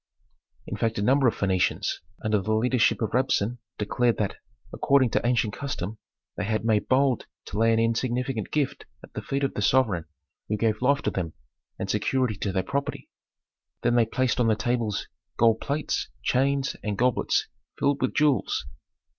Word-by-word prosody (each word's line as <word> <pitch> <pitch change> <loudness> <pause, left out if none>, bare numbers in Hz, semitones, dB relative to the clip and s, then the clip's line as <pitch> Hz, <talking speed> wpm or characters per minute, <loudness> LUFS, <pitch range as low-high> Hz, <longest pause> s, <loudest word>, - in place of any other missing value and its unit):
In - - -4
fact 115 -1 0
a - - 0
number 135 +3 +4
of 115 - +2
Phœnicians, 95 -2 0 0.3
under 105 -2 +2
the 110 +3 0
leadership 120 0 +2
of 105 - -1
Rabsun, 125 -2 +1 0.2
declared 120 +3 +1
that, 100 -3 -1 0.4
according 135 -4 +3
to - - +1
ancient 120 -3 +1
custom 110 -7 -4 0.4
they 100 - -3
had 110 +1 -1
made 110 -2 +2
bold 130 -2 +2 0.2
to 105 - -4
lay 115 0 +4
an 115 - +3
insignificant 120 +1 0
gift 145 -3 -1 0.2
at - - -14
the - - -4
feet 135 +7 -2
of 135 - 0
the - - -3
sovereign 105 -7 +2 0.4
who 105 - 0
gave 110 0 0
life 140 +2 +3
to - - 0
them 85 -4 -3 0.4
and 95 - -3
security 110 +4 +1
to 100 0 -2
their 95 0 0
property. 140 +8 -3 0.7
Then 120 - +3
they 120 -2 +4
placed 130 +2 0
on 120 - +3
the 110 - +4
tables 115 -1 -1 0.3
gold 115 -1 +4
plates, 145 +2 -2
chains, 135 +1 +1
and 105 -2 -2
goblets 125 +1 +2 0.3
filled 140 0 +1
with 130 - 0
jewels. 145 - +2
115 Hz, 175 wpm, -26 LUFS, 105-130 Hz, 0.7 s, number